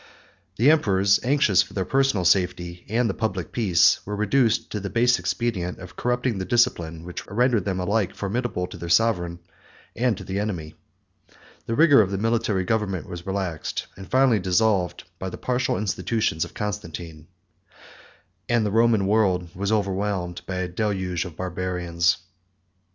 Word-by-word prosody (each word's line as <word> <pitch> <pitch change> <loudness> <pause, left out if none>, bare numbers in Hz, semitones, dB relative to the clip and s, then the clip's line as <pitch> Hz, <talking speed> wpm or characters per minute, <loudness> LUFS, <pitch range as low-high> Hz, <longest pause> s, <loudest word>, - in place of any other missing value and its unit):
The 130 +7 +5
emperors, 100 -9 +3
anxious 125 -8 +3
for - - -7
their 95 -2 -1
personal 135 -5 +1
safety 90 -1 +1
and 115 +3 +1
the - - -1
public 100 -6 -3
peace, 90 -7 +4
were 105 - -4
reduced 110 +3 +1
to 105 - -2
the 100 0 -5
base 120 +5 +3
expedient 95 -7 -2
of 95 -1 -11
corrupting 125 -3 -1
the - - -2
discipline 85 -7 +1
which 90 0 -7
rendered 115 -1 +1
them 95 -2 -1
alike 100 +2 0
formidable 100 -2 -2
to - - -10
their 85 - -6
sovereign 85 -3 +2 0.6
and 120 -3 +1
to - - -8
the 95 +1 -3
enemy; 90 -7 -4 0.9
the 115 - -1
vigor 145 -4 +6
of 95 - 0
the 100 - -2
military 110 -2 0
government 100 -3 -1
was 90 -2 -8
relaxed, 95 -5 -3
and 95 0 -11
finally 130 -4 +4
dissolved, 90 0 +1 0.2
by 95 - -4
the - - -8
partial 125 -4 -1
institutions 105 -3 -1
of - - -14
Constantine; 85 -6 -6 1.2
and 120 -2 +2
the 105 - -1
Roman 115 -2 +3
world 95 -4 +1
was 100 +3 -2
overwhelmed 100 -3 -1
by 95 - -3
a 90 0 -2
deluge 95 -2 -2
of 85 -4 -9
Barbarians. 90 -1 0
100 Hz, 160 wpm, -24 LUFS, 90-115 Hz, 1.2 s, vigor